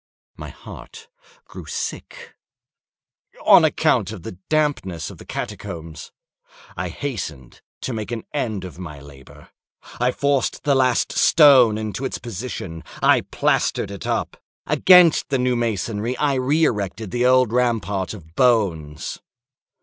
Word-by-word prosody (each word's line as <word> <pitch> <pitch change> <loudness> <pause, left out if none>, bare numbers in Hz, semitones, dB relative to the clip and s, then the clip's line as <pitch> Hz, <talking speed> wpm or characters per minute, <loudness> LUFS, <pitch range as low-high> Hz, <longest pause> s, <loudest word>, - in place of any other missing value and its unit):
My - - -8
heart 455 0 -12 0.4
grew - - -11
sick—on 475 -1 -6 1.3
account 150 - +2
of 100 -7 -9
the - - -6 0.2
dampness 145 - -1
of - - -14
the - - -12
catacombs. 80 -2 -7 0.6
I 90 -1 -4
hastened 85 - -6 0.2
to 130 - -4
make 110 -2 -5
an 115 -2 -4
end 110 -9 -2
of 90 -1 -10
my 75 -5 -8
labor. 70 -2 -15 0.5
I 125 +1 +2
forced 140 -1 -1
the 145 - +2
last 130 -3 +2
stone 130 -8 +6
into 110 +4 -4
its 135 - -3
position; 95 -7 -7 0.2
I - - +5
plastered - - 0
it 100 - -7
up. - - -2 0.3
Against 180 -3 +5
the 135 - +1
new 125 0 +1
masonry 115 +1 -2
I 145 -2 +1
re 135 +5 +1
erected 105 - -1
the 125 +1 +1
old 130 -3 +3
rampart 110 -6 0
of 80 -5 -15
bones. 90 - 0
115 Hz, 135 wpm, -21 LUFS, 95-130 Hz, 1.3 s, stone